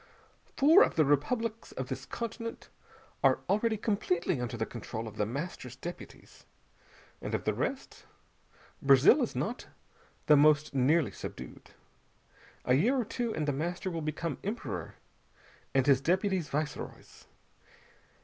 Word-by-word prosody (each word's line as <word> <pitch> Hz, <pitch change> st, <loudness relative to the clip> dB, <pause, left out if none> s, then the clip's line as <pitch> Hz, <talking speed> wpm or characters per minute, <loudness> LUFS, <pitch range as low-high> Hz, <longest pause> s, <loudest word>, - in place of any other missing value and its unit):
Four 315 Hz, +8 st, +7 dB
of -, -, +3 dB
the 155 Hz, -, +4 dB
republics 225 Hz, -, 0 dB
of -, -, -4 dB
this -, -, -5 dB
continent 230 Hz, 0 st, -6 dB, 0.5 s
are -, -, +4 dB
already 220 Hz, +2 st, +1 dB
completely 180 Hz, -, 0 dB
under 120 Hz, 0 st, -4 dB
the 110 Hz, -, -1 dB
control 115 Hz, -1 st, -6 dB
of 110 Hz, -, -9 dB
The 105 Hz, -, 0 dB
Master's 130 Hz, -1 st, -5 dB
deputies, 175 Hz, +6 st, -10 dB, 0.7 s
and -, -, -2 dB
of -, -, -3 dB
the -, -, +1 dB
rest, -, -, -4 dB, 0.7 s
Brazil 140 Hz, -, +6 dB
is 245 Hz, -, -2 dB
not 235 Hz, +5 st, -3 dB, 0.6 s
the 150 Hz, -, +7 dB
most 150 Hz, 0 st, +4 dB
nearly 140 Hz, +4 st, +3 dB
subdued. 65 Hz, -1 st, -9 dB, 1.0 s
A 125 Hz, -, +3 dB
year 210 Hz, -, +3 dB
or 245 Hz, -, 0 dB
two, 235 Hz, +1 st, -2 dB
and 155 Hz, -1 st, -2 dB
The 145 Hz, -, +1 dB
Master 175 Hz, +6 st, -3 dB
will 165 Hz, -1 st, -3 dB
become 155 Hz, 0 st, -3 dB
Emperor, 210 Hz, +5 st, -4 dB, 0.8 s
and 135 Hz, -1 st, +4 dB
his 135 Hz, -2 st, +4 dB
deputies 185 Hz, 0 st, +1 dB
viceroys. 150 Hz, 0 st, -5 dB
160 Hz, 140 wpm, -30 LUFS, 135-215 Hz, 1.0 s, Four